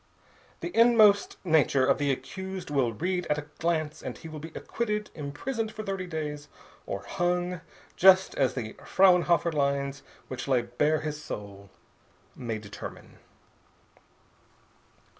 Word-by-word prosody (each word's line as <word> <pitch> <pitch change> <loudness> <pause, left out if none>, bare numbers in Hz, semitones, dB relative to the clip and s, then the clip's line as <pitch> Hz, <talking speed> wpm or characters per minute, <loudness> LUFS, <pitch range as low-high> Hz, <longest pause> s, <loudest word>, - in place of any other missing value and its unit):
The 350 - -5
inmost 220 -3 +5
nature 145 -5 +4
of - - +3
the 145 -1 +2
accused 190 +5 -5
will 135 -5 +2
be 110 - -12 0.2
read 180 - -4
at 150 - +1
a 150 - -5
glance 155 -2 -1
and - - -6
he - - -10
will 155 -1 -7
be 160 +2 -8
acquitted, 210 -2 -3
imprisoned 215 - -4
for 215 - -6
thirty 195 -3 -3
days, 150 -3 -4 0.4
or - - -4
hung, 175 0 -1 0.3
just 190 +1 +6
as 135 -2 +1
the 110 -4 -4
Frauenhofer 175 -2 +4
lines 140 -1 0 0.3
which 130 +1 -6
lay 130 -3 +3
bare 150 +5 +1
his 150 -1 -4
soul 100 -4 -8 0.7
may 115 -3 -4
determine. 105 -1 -10
155 Hz, 140 wpm, -28 LUFS, 140-185 Hz, 0.7 s, just